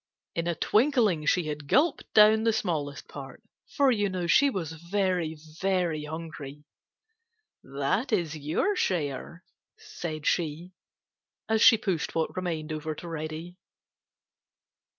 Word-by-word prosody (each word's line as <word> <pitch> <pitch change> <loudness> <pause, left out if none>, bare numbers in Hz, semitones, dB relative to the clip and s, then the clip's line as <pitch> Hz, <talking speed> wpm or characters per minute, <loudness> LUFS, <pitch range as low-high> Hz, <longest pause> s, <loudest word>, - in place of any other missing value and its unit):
In 170 0 -2
a 170 - 0
twinkling 215 - +2
she 180 - +3
had 150 -1 -5
gulped 300 - +2
down 215 +1 +7
the 225 - +3
smallest 155 -9 -2
part, 140 +9 -10 0.3
for 280 -2 +4
you 205 -4 +1
know 185 -2 -3
she 280 +11 +5
was 180 - -4
very, 170 -1 -1 0.2
very 180 -5 0
hungry. 150 -2 -7 1.0
"That 140 - -1
is 170 -7 0
your 155 - 0
share," 170 - -2 0.3
said 170 - -6
she, 170 +1 -1 0.8
as 220 -1 +1
she 240 -3 +8
pushed 185 -7 -2
what 165 -1 -1
remained 165 -4 -3
over 155 0 -4
to 175 - -9
Reddy. 160 +2 -6
170 Hz, 130 wpm, -28 LUFS, 155-205 Hz, 1.0 s, she